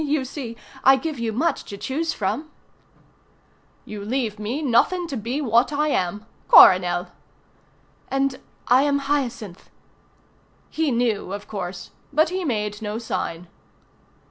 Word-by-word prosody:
you 290 -2 0
see, 245 -4 -7 0.3
I 270 +1 +7
give 295 0 -4
you 230 -1 -1
much 300 +10 0
to 200 - -8
choose 310 +10 -2
from." 220 +10 -3 1.4
"You 210 -1 -7
leave 220 -2 -2
me 240 +9 -3
nothing 295 +8 +2
to 275 - -4
be 245 +6 -3
but 255 -6 -4
what 235 +5 +4
I 300 +1 +1
am 205 -2 -1 0.2
Coronel." 180 -1 +7 1.0
"And 270 -1 0 0.3
I 250 +2 +5
am 285 0 +2
Hyacinth." 265 -9 -3 1.0
He 320 -1 0
knew, 230 -6 0
of 205 0 -7
course, 180 -3 -6 0.2
but 310 +2 +3
he 370 +1 -3
made 210 -7 -2
no 210 0 -3
sign. 180 -6 -4
240 Hz, 140 wpm, -23 LUFS, 210-285 Hz, 1.4 s, I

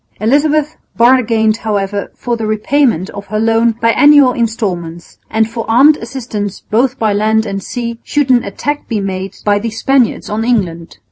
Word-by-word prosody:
Elizabeth 295 +7 +1 0.2
bargained 230 -3 +3
however 205 -3 -3
for 240 -1 -3
the 225 -2 -4
repayment 215 - 0
of 200 0 -9
her 215 - -2
loan 225 +1 +2
by 230 0 +3
annual 290 -1 +5
installments, 185 -8 -4
and 220 0 +1
for 230 0 -5
armed 275 +7 +5
assistance 225 -5 -5
both 255 +4 0
by 215 -2 0
land 220 +2 +1
and 195 -2 -4
sea 235 +1 -5
should 290 -3 0
an 245 -2 +4
attack 285 +9 -4
be 220 - -2
made 190 -1 -5
by 205 -1 +2
the 230 +2 -3
Spaniards 245 +2 0
on 215 +2 -2
England. 180 -8 -2
225 Hz, 165 wpm, -14 LUFS, 205-245 Hz, 0.2 s, annual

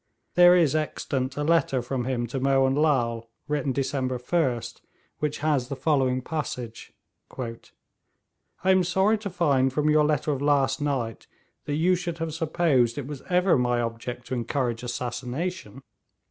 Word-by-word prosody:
There 175 0 +7
is 160 -5 +3
extant 140 -3 -2
a 145 - -1
letter 160 -4 +2
from 125 0 -3
him 125 -2 -1
to 125 +3 -4
Mohun 135 0 +3
Lal, 120 -6 +1 0.2
written 145 -2 -1
December 130 -1 -1
1st, 125 -3 -1 0.4
which 150 -1 -1
has 140 -5 +1
the 140 - -4
following 130 -4 +1
passage: 125 -7 -5 0.5
'I 120 -3 -3 1.1
am 190 -1 +5
sorry 190 +5 +2
to 205 -1 -5
find 140 -7 +2
from 150 +3 +1
your 150 0 +4
letter 150 0 +1
of 140 -2 -2
last 140 -1 +2
night 130 -6 -2 0.4
that 145 - -2
you 170 +4 +3
should 175 -2 -3
have 165 -2 -3
supposed 155 -7 +1
it 145 - -4
was 140 -1 -7
ever 180 -4 +3
my 120 -1 +1
object 120 +1 -4
to - - -5
encourage 120 -1 -1
assassination. 125 - -4
135 Hz, 155 wpm, -26 LUFS, 125-155 Hz, 1.1 s, There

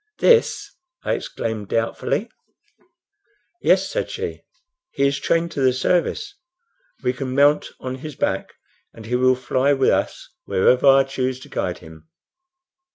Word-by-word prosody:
"This!" 465 -1 +3 0.3
I - - 0
exclaimed, 110 -3 -4
doubtfully. 115 - -1 1.3
"Yes," - - +3
said - - -3
she. - - -5 0.5
"He 140 - 0
is 140 0 +1
trained 170 0 0
to 140 - -3
the 130 -1 +4
service. 180 - 0 0.7
We 125 - +1
can 130 0 -4
mount 145 +2 +4
on 130 0 -5
his 140 +2 -8
back, - - -2 0.4
and 110 - -11
he 120 +2 -1
will 130 +1 +4
fly 130 +2 +1
with 135 -1 +3
us - - -1 0.2
wherever 125 +8 +3
I 135 0 +7
choose 130 -1 -3
to - - -13
guide 90 -1 -2
him." 80 0 -15
130 Hz, 145 wpm, -22 LUFS, 125-140 Hz, 1.3 s, I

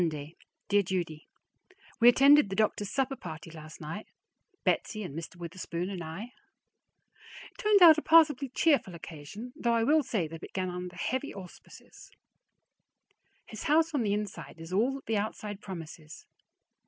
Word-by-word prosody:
Monday. 155 -2 -3 0.3
Dear 205 0 +4
Judy: 175 -5 -4 0.7
We 240 0 +8
attended 275 -1 +6
the 195 - -3
doctor's 210 -1 0
supper 270 0 -1
party 160 -6 -9
last 155 -1 -11
night, 165 +7 -7 0.6
Betsy 215 -2 0
and 150 -7 -7
Mr. 165 +2 -7
Witherspoon 175 +1 -5
and 180 -3 -5
I. 185 +10 -7 1.2
It - - -28
turned 420 -3 +5
out 320 -2 +9
a - - -6
passably 300 -5 +5
cheerful 265 - +2
occasion, 170 +9 -9
though 240 -6 0
I 230 - +2
will 305 +6 +4
say 210 - -2
that 165 +1 -8
it - - -21
began 185 -1 -4
under 180 0 -6
heavy 260 +10 -2
auspices. 185 -3 -13 1.4
His 215 - -8
house 320 +2 +3
on 285 - +1
the 205 -3 +1
inside 195 -8 -6
is 165 +2 -9
all 225 +7 +2
that 275 - -10
the 225 - 0
outside 205 -1 -4
promises. 165 -5 -9
200 Hz, 160 wpm, -29 LUFS, 170-250 Hz, 1.4 s, out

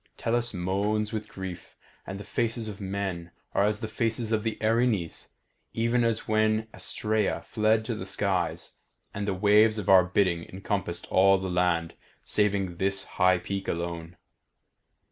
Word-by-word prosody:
Tellus 120 +1 0
moans 100 +4 -1
with 110 -1 -3
grief, 95 -3 -8 0.3
and 95 +1 -5
the - - -7
faces 115 0 -2
of 105 -1 -7
men 95 -3 -3 0.2
are 100 - +3
as 105 +2 0
the 110 - -2
faces 115 +1 -1
of 110 -1 +2
the 110 0 -2
Erinyes, 110 -5 +1 0.5
even 115 +1 +1
as 115 -1 0
when 110 0 +2
Astraea 110 -1 -1
fled 110 0 +1
to 115 - -2
the 110 - -6
skies, 95 -3 -1 0.4
and 100 +1 -3
the 100 - +1
waves 105 +3 +5
of 105 - -3
our 95 -1 +8
bidding 90 -2 +1
encompassed 95 -2 -3
all 95 +1 +6
the 95 -1 -4
land 90 -2 +1 0.3
saving 100 -4 0
this 95 +1 +1
high 90 -1 +3
peak 95 +2 -4
alone. 85 0 -4
100 Hz, 155 wpm, -27 LUFS, 95-110 Hz, 0.5 s, our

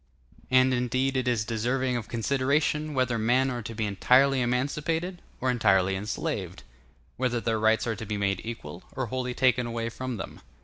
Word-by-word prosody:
]] - - -27
And 130 0 +5
indeed 130 +2 0
it 130 -1 0
is 115 -3 +1
deserving 125 +3 0
of 115 -3 -3
consideration, 140 +5 0
whether 125 -3 +1
men 125 +4 +2
are 120 -1 -3
to 115 +1 -7
be 110 0 -1
entirely 130 +7 +4
emancipated 150 +8 -1 0.2
or 130 0 +1
entirely 95 -5 +3
enslaved; 95 - -4 0.5
whether 125 -2 0
their 115 -1 0
rights 110 +1 +3
are 115 -2 -1
to 110 - -7
be 105 - -2
made 100 -2 0
equal, 115 -6 -7
or 130 - -1
wholly 125 -1 -2
taken 125 -2 +3
away 115 0 -2
from 130 +1 -5
them. - - -7
125 Hz, 180 wpm, -27 LUFS, 110-130 Hz, 0.5 s, And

